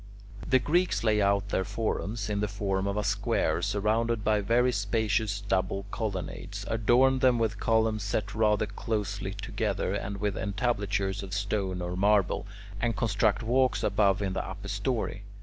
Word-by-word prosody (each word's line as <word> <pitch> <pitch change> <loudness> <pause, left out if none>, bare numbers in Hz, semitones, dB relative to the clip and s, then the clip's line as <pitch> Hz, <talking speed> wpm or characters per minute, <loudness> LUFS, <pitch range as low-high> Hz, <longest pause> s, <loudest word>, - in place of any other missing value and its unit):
The 130 - +6
Greeks 175 +6 +1
lay 105 -2 +3
out 100 0 +2
their 95 - 0
forums 110 +1 -2
in 105 -1 -1
the 105 - 0
form 100 -1 -1
of 100 +1 -1
a 105 - 0
square - - 0
surrounded 110 +2 0
by 105 -1 +2
very 120 +4 +3
spacious 105 -1 0
double 95 0 -1
colonnades, 100 -1 -4
adorn 120 +5 +3
them 125 -2 +4
with 110 -3 -1
columns 110 -1 +2
set 100 +1 -2
rather 110 -1 +2
closely 100 -1 -3
together, 100 -1 -2
and 100 0 -3
with 100 -1 -1
entablatures 100 -1 -1
of 95 -1 -5
stone 100 -3 -1
or 90 +1 -3
marble, 100 0 +2 0.3
and 120 -1 0
construct 110 -1 +1
walks 130 +3 +2
above 100 -1 +2
in 95 -1 -1
the - - -2
upper 95 +2 -7
story. 105 0 -2
105 Hz, 160 wpm, -28 LUFS, 100-110 Hz, 0.3 s, The